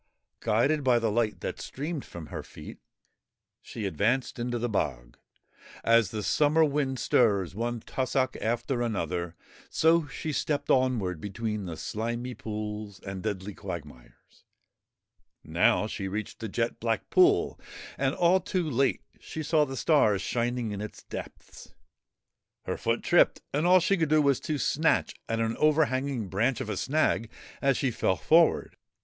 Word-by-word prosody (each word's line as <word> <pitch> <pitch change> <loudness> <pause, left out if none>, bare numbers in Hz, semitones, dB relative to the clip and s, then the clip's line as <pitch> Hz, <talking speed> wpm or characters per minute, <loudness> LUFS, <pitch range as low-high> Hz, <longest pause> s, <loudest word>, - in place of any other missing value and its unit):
Guided 130 +7 +2
by 125 -2 +4
the 115 -2 0
light 110 -1 0
that - - -4
streamed 150 +1 -4
from 85 -2 -9
her - - -3
feet, - - -11 0.8
she 110 - -6
advanced 120 +7 0
into 120 0 -2
the 120 +1 -1
bog. - - -2 0.7
As 115 -4 +4
the 105 0 -4
summer 150 +8 +3
wind 140 -3 -1
stirs 100 -7 +2
one 120 +2 -3
tussock 130 +1 -1
after 120 +3 -1
another, 90 -7 -2 0.3
so 160 -1 +3
she 155 +3 -5
stepped 145 0 -1
onward 115 - +1
between 105 0 -3
the 85 -3 -6
slimy 120 +3 -3
ponds 105 -2 -6
and 95 -1 -6
deadly 105 -1 -4
quag 85 -5 -6
mires. - - -19 1.0
Now 85 +6 +2
she 100 -2 -4
reached 105 +3 -5
a 110 - -4
jet 115 +4 -2
black 115 -1 -2
pool, 370 +2 +4 0.4
and - - 0
all 175 +2 +4
too 185 -2 -2
late 135 -1 +1 0.2
she 160 - -6
saw 150 0 +3
the 135 -1 -6
stars 110 - +3
shining 120 -1 -1
in 100 0 -4
its 105 - -8
depths. - - -10 0.9
Her - - -3
foot - - -1
tripped - - +3
and 150 +4 +1
all 185 +1 +7
she 195 +3 +2
could 160 -3 0
do 155 0 +4
was 140 -2 +3
to 155 - -2
snatch 155 +3 +1 0.2
at 115 0 0
an 115 0 0
overhanging 140 -6 +1
branch 115 +7 0
of - - -4
a 100 - -3
snag 135 -5 +1 0.3
as 135 -2 +3
she 130 - 0
fell 95 -4 +1
forward. 165 - +3
120 Hz, 155 wpm, -28 LUFS, 105-145 Hz, 1.0 s, all